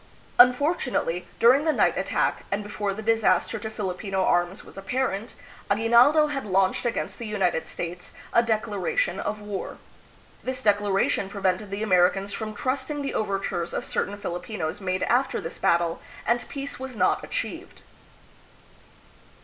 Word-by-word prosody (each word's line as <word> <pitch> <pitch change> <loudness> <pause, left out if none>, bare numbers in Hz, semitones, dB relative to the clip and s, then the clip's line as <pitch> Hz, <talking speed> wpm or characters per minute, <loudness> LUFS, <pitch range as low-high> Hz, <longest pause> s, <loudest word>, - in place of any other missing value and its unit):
Unfortunately, 250 - +3
during 255 +5 +6
the 315 - +3
night - - +2
attack - - 0
and 200 +1 -1
before 205 0 -3
the 215 +3 -6
disaster 225 0 +2
to 220 - -5
Filipino 195 -2 -2
arms 175 +1 +1
was - - -14
ap 195 0 -10
parent, 250 -4 -1 0.3
Aguinaldo 235 +8 +5
had 290 -2 -3
launched 195 +3 +1
against 235 - -3
the 235 - -5
United 190 -6 0
States 175 +1 -6 0.2
a 235 - +6
declaration 220 - 0
of 210 - -3
war. 205 -2 -5 0.7
This 255 0 -3
declaration 205 -3 +1
prevented 195 0 -1
the 200 +2 -3
Americans 195 0 +3
from 215 -1 -5
trusting 275 +5 -2
the 275 - -3
overtures 195 -4 -2
of - - -2
certain 205 +1 -2
Filipinos 180 -1 -4
made 185 -1 -1
after 260 +2 +1
this 165 - -7
battle, 170 0 +2 0.2
and 240 0 0
peace 275 -1 -5
was 260 -1 -6
not - - +2
achieved. - - -5
210 Hz, 145 wpm, -25 LUFS, 190-245 Hz, 0.7 s, during